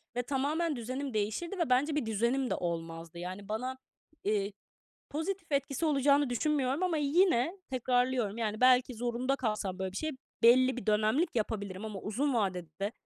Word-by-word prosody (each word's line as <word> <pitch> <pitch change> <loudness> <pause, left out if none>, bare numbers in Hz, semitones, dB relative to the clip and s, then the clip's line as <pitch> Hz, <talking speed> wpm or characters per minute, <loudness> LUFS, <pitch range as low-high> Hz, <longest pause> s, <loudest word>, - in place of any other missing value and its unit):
ve 245 - 0
tamamen 290 +5 0
düzenim 255 +3 -4
değişirdi 220 - -2
ve 335 -6 0
bence 285 +4 +3
bir 295 - 0
düzenim 235 +4 0
de - - +1
olmazdı. 165 -1 -4
Yani, 185 +3 -6
bana, 255 +4 -3 0.5
eee, 205 -1 0 0.6
pozitif 330 +2 -3
etkisi 280 +3 0
olacağını 280 -2 +3
düşünmüyorum 280 +3 0
ama 355 -3 +1
yine 320 +2 +2
tekrarlıyorum. 250 -3 +1
Yani, 215 -1 -2
belki 255 0 +5
zorunda 245 +3 -1
kalsam 210 -6 -2
böyle 190 -1 -3
bir - - -8
şey 310 0 -1 0.3
belli 255 +2 +6
bir 250 - -6
dönemlik 215 +11 +2
yapabilirim 205 -2 -2
ama 210 -3 -5
uzun 255 +8 -1
vadede, 190 -2 -2
250 Hz, 155 wpm, -31 LUFS, 210-280 Hz, 0.6 s, belli